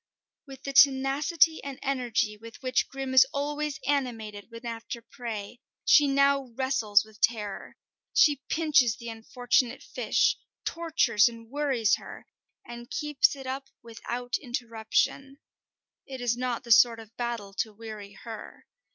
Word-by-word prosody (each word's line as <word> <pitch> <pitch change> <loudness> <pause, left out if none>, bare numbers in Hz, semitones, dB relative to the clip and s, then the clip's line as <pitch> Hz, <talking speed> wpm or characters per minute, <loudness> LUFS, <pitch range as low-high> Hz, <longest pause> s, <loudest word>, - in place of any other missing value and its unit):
With 270 0 -12
the 275 - -4
tenacity 280 +4 +4
and 275 -2 -6
energy 245 -5 0
with 230 +4 -13
which 255 0 +1
Grim 270 -1 -5
is 260 0 +7
always 295 +1 -3
animated 230 -8 -2
when 230 +1 -11
after 230 +1 -5
prey, 230 -1 -7 0.3
she 295 -2 +6
now 275 0 +3
wrestles 230 -6 +2
with 215 -1 -19
Terror. 210 -4 -1 0.3
She 290 -3 +4
pinches 295 -8 +3
the 235 -1 -7
unfortunate 245 +2 0
fish, - - +1 0.3
tortures 320 -10 +2
and 230 0 -13
worries 270 -7 +1
her, - - -11 0.4
and 240 0 -10
keeps 295 - +1
it 270 -1 -10
up 270 +1 -5
without 240 +2 -4
interruption. 240 +2 -2 0.7
It 265 -1 -7
is 240 -1 0
not 250 -1 -3
the 235 - -6
sort 230 0 +6
of 225 0 -14
battle 235 -5 -4
to 220 - 0
weary 210 -2 -9
her. 225 +2 -10
245 Hz, 140 wpm, -28 LUFS, 225-275 Hz, 0.7 s, is